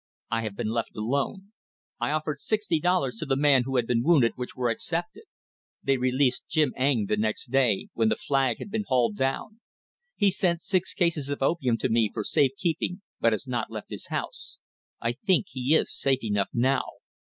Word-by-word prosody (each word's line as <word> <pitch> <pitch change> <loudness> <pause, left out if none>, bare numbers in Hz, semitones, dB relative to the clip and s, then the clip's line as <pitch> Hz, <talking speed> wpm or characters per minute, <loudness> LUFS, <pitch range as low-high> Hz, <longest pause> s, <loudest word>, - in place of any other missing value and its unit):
I 115 - +1
have 110 -3 -4
been 110 - -2
left 115 0 -2
alone. 140 - -2 0.5
I - - 0
offered 150 -1 -2
sixty 210 -5 0
dollars 150 -8 +1
to 155 - -4
the 135 - +2
man 135 -3 +4
who 135 0 -3
had 120 -2 +2
been 115 0 +1
wounded, 135 -5 +4
which 125 -1 -6
were 125 -2 0
accepted. 175 - -4 0.6
They 135 -1 +2
released 130 +1 +1
Jim 150 -4 +2
Eng 130 -5 +2
the 105 - 0
next 110 +3 -2
day, 125 -7 +2
when 110 -1 +2
the - - +2
flag 135 -4 0
had 205 - -8
been 215 -1 -1
hauled 120 -5 +2
down. 135 - -2 0.6
He 205 -2 +3
sent 175 -2 0
six 190 -2 0
cases 170 -7 +1
of 145 -1 -2
opium 135 -6 +1
to - - -1
me 115 -1 +3
for 110 - -3
safe 140 +2 +2
keeping 180 +2 -2 0.2
but 115 - +3
has 110 +5 -2
not 120 -3 -2
left 110 -2 -8
his - - -6
house. - - -5 0.4
I 115 - 0
think 190 - +1
he 130 +3 +1
is - - +1
safe 135 -2 +1
enough 105 -3 0
now. 130 +3 +2
135 Hz, 200 wpm, -27 LUFS, 115-160 Hz, 0.6 s, man